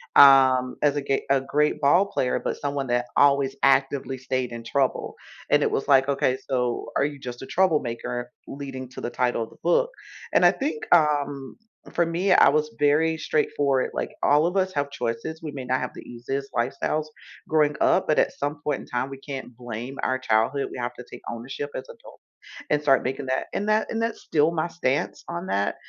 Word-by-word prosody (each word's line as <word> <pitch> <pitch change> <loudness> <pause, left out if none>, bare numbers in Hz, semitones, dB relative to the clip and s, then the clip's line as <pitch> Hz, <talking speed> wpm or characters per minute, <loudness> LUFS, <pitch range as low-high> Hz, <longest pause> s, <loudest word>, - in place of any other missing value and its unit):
um, 130 -2 +7
as 145 -1 +3
a 145 - -1
ge 135 -1 0
a 135 0 +4
great 150 +3 0
ball 175 +8 +4
player, 125 -9 -1
but - - -2
someone 140 -1 -2
that 120 0 0
always 140 -1 +3
actively 135 -1 +2
stayed 130 -1 -2
in 115 0 -7
trouble. 135 +2 -1 0.4
And - - +5
it - - +2
was - - -2
like, 135 -1 +5
"Okay, 135 -2 +1
so 125 -2 -1
are 140 - +3
you 145 -1 -5
just 125 -2 -7
a - - -6
troublemaker," 125 -8 0 0.2
leading 135 -2 -7
to - - -9
the - - -3
title 120 -1 0
of 110 - -10
the - - -18
book. 485 0 +2 0.4
And - - +4
I - - +8
think, 310 +11 -3
um, 145 -4 0 0.4
for 170 - +3
me, 175 +4 0
I - - +7
was 150 +1 +1
very 155 +3 +3
straightforward. 145 -4 0
Like, - - -3
all 150 +3 +4
of 180 +3 -2
us 190 0 +1
have 145 -1 -1
choices. 125 +4 -4
We 155 - -5
may 135 -3 -7
not 130 +1 0
have 125 - -3
the - - -9
easiest 135 +3 -5
lifestyles 135 +5 -1 0.4
growing 150 -2 +2
up, - - +3
but 155 - +2
at - - +2
some 145 +1 -3
point 145 -2 -1
in - - -13
time, 125 +1 -2
we 135 - -8
can't 135 -3 -7
blame 120 +2 -7
our 130 - 0
childhood. 130 +3 +1
We - - -7
have 120 0 -3
to 125 - -10
take - - -10
ownership 125 +5 -6
as - - -4
adults - - -15 0.5
and 150 - +3
start 135 -2 +3
making 135 +1 -3
that 130 0 -1
And 205 +2 -2
that 215 +1 +1
and 225 - -2
that's 230 0 -2
still 155 0 +2
my 170 0 -1
stance 145 -5 -2
on 170 +1 -4
that. 100 - 0
140 Hz, 210 wpm, -25 LUFS, 130-150 Hz, 0.5 s, I